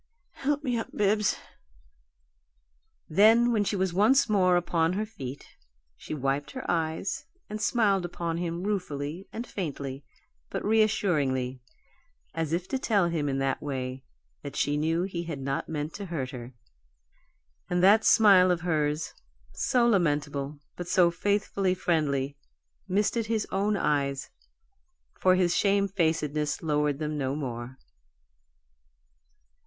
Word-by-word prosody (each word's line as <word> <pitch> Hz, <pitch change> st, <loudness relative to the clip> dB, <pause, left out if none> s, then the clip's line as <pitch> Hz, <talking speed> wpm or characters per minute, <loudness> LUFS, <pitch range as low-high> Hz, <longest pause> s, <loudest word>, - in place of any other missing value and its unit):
"Help 290 Hz, +2 st, -1 dB
me 250 Hz, -4 st, 0 dB
up, -, -, -4 dB
Bibbs." 210 Hz, +1 st, +2 dB, 1.7 s
Then, 225 Hz, +7 st, +5 dB
when 215 Hz, -3 st, +2 dB
she 205 Hz, -, -1 dB
was 190 Hz, -2 st, 0 dB
once 220 Hz, +8 st, +4 dB
more 185 Hz, -4 st, +3 dB
upon 170 Hz, -1 st, +1 dB
her 210 Hz, +3 st, -1 dB
feet, 140 Hz, -, -8 dB, 0.5 s
she 155 Hz, -, -6 dB
wiped 140 Hz, +1 st, -1 dB
her 260 Hz, -, -6 dB
eyes 165 Hz, -, -2 dB, 0.2 s
and 215 Hz, 0 st, -5 dB
smiled 205 Hz, -3 st, +2 dB
upon 170 Hz, -1 st, -3 dB
him 170 Hz, 0 st, -3 dB
ruefully 180 Hz, -4 st, -3 dB
and 235 Hz, +2 st, -5 dB
faintly, 140 Hz, -, -5 dB, 0.5 s
but -, -, -4 dB
reassuringly, 150 Hz, -, +1 dB, 0.7 s
as 160 Hz, -2 st, -2 dB
if 175 Hz, +2 st, -1 dB
to 265 Hz, -, -1 dB
tell 200 Hz, -8 st, +2 dB
him, 155 Hz, -4 st, -1 dB
in 135 Hz, -, -1 dB
that 135 Hz, 0 st, -1 dB
way, 130 Hz, -2 st, -4 dB, 0.4 s
that -, -, -8 dB
she 145 Hz, -, +1 dB
knew 160 Hz, +3 st, +1 dB
he 175 Hz, -3 st, -4 dB
had 160 Hz, -4 st, -5 dB
not 135 Hz, +1 st, -3 dB
meant 155 Hz, 0 st, -3 dB
to 200 Hz, -1 st, -6 dB
hurt 140 Hz, -7 st, -3 dB
her. 120 Hz, -1 st, -9 dB, 1.1 s
And 180 Hz, 0 st, +1 dB
that 210 Hz, +3 st, +6 dB
smile 195 Hz, -5 st, +6 dB
of 175 Hz, -2 st, +1 dB
hers, 155 Hz, -3 st, -1 dB, 0.4 s
so 240 Hz, -, +2 dB
lamentable, 150 Hz, -7 st, 0 dB, 0.2 s
but 175 Hz, -, -6 dB
so 175 Hz, -1 st, +4 dB
faithfully 200 Hz, 0 st, 0 dB
friendly, 145 Hz, -6 st, 0 dB, 0.5 s
misted 210 Hz, +3 st, 0 dB
his 220 Hz, -1 st, 0 dB
own 200 Hz, +2 st, +1 dB
eyes, 140 Hz, -5 st, -1 dB, 0.9 s
for 185 Hz, 0 st, +4 dB
his 180 Hz, -2 st, +2 dB
shamefacedness 165 Hz, -8 st, +1 dB
lowered 150 Hz, -2 st, +1 dB
them 150 Hz, 0 st, -3 dB
no 135 Hz, 0 st, -1 dB
more. 125 Hz, -3 st, -5 dB
170 Hz, 135 wpm, -28 LUFS, 145-200 Hz, 1.7 s, that